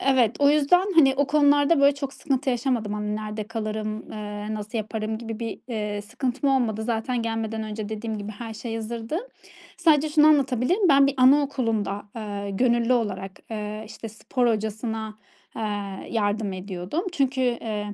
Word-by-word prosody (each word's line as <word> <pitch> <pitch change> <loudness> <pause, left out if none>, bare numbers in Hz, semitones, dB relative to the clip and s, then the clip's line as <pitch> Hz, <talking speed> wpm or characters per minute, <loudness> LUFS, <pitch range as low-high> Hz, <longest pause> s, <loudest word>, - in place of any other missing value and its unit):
E - - -5
evet. 245 -4 +3
O 285 0 +5
yüzden 355 +7 +3
hani 275 -5 +6
o 285 - +2
konularda 290 +1 +4
böyle 280 0 +6
çok 275 -1 -5
sıkıntı 270 -2 -1
yaşamadım. 240 -4 0
Hani 210 0 -2
nerede 215 0 -4
kalırım, 215 -1 -4
eee, 210 0 -5
nasıl 215 +2 -4
yaparım 220 0 -3
gibi 225 -1 -6
bir, 230 -1 -4
eee, 210 -3 -3
sıkıntım 255 +5 -1
olmadı. 230 -5 +1
Zaten 235 +1 -1
gelmeden 225 -1 -2
önce 215 -1 -5
dediğim 220 0 -4
gibi 205 +1 -6
her 225 +1 -7
şey 225 +1 -5
hazırdı. 230 +6 -3 0.6
Sadece 310 -3 +4
şunu 300 0 +5
anlatabilirim: 295 - +3
Ben 275 -1 +6
bir 280 - 0
anaokulunda, 255 -7 +2
eee, 205 -2 -4
gönüllü 235 +3 +2
olarak, 195 -5 -1 0.2
eee, 215 0 -4
işte, 225 +1 -8
spor 240 +3 -1
hocasına, 220 0 -2 0.4
eee, - - -4 0.5
yardım 205 -2 0
ediyordum. 185 - -4
Çünkü, 275 -5 0
eee, 220 -4 -1
225 Hz, 160 wpm, -25 LUFS, 215-270 Hz, 0.6 s, hani